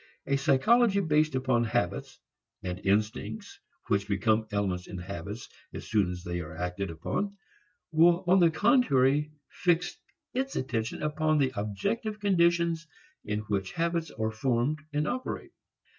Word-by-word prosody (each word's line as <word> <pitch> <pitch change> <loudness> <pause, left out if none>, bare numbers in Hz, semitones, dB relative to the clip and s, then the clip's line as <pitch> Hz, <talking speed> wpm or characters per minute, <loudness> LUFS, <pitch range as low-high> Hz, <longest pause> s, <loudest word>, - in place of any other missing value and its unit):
A 140 - +1
psychology 195 - +4
based 155 -5 +2
upon 130 -2 +2
habits 115 -6 -2 0.5
(and 90 0 -4
instincts 110 - -1 0.3
which 100 -2 +1
become 110 +2 +1
elements 95 -3 -1
in 95 - -7
habits 100 +5 -6 0.3
as - - -6
soon 105 -4 +2
as 90 0 -6
they 90 -1 -3
are 80 -1 -7
acted 90 +2 -3
upon) 200 - -3 0.5
will 170 +3 +5
on 185 +2 +5
the 170 -2 +6
contrary 150 - +3 0.2
fix 175 -1 +1 0.4
its 270 +2 -2
attention 115 -2 -2
upon 155 +1 +1
the 135 -3 +2
objective 105 - -2
conditions 170 -4 +2 0.4
in 105 0 -2
which 100 -3 -2
habits 170 -1 -1
are 110 0 -2
formed 125 +6 0
and 150 +1 0
operate. 255 +7 -4
130 Hz, 140 wpm, -29 LUFS, 105-170 Hz, 0.5 s, the